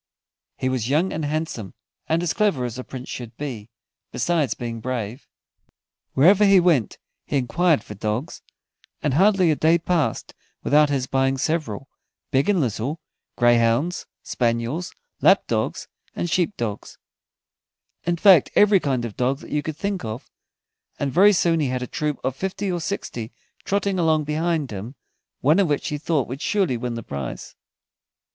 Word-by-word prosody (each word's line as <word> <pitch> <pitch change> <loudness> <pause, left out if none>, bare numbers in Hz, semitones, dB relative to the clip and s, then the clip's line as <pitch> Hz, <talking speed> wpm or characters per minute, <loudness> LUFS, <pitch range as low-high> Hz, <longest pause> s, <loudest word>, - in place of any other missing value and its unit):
He 130 - -2
was 130 -2 -1
young 160 +7 +1
and 155 - -3
handsome, 150 - -3 0.3
and 165 +2 +1
as 170 - 0
clever 195 -13 +1
as 120 +1 -5
a - - -4
Prince 130 0 -8
should 120 -2 -7
be, 120 -7 -6 0.4
besides 165 -6 0
being 115 -2 -5
brave. 125 0 -4 0.9
Wherever 185 +9 +6
he 195 -2 +6
went 165 - +2 0.3
he - - -1
enquired 145 +2 +2
for - - -9
dogs, 110 - -3 0.6
and 145 -2 +1
hardly 190 +1 +4
a - - +2
day 160 +3 +4
passed 170 -2 -1 0.3
without 150 +1 +4
his 135 -3 0
buying 135 +1 +1
several, 135 -4 -2 0.4
big 135 +7 +2
and 200 -3 +3
little, 130 +3 -2 0.4
greyhounds, 120 +7 +2 0.2
spaniels, 120 +8 -1 0.3
lap - - +5
dogs, - - -2 0.3
and - - -2
sheep 185 +3 +1
dogs 105 -3 -5 1.1
in 175 0 0
fact, 185 -5 +6
every 205 -1 +6
kind 130 -7 -1
of 110 - -7
dog 130 +2 0
that - - -12
you 150 - +1
could 155 0 -5
think 200 -4 -2
of, 110 +2 -6 0.7
and 140 -1 -2
very 200 +4 +7
soon 170 -3 +2
he 145 - +1
had 125 0 -2
a - - -2
troop 150 +2 -2
of 130 0 -1
fifty 190 +3 -3
or 175 -1 -2
sixty 120 - -4 0.3
trotting 200 -1 0
along 160 -2 +2
behind 155 -1 -1
him, 105 +7 -7 0.5
one 155 +8 +4
of 195 - +3
which 145 -2 -1
he 150 - -3
thought 150 -4 0
would 135 +3 -6
surely 195 - +1
win 120 0 -3
the 115 - -5
prize. 70 -7 -6
145 Hz, 165 wpm, -23 LUFS, 125-170 Hz, 1.1 s, very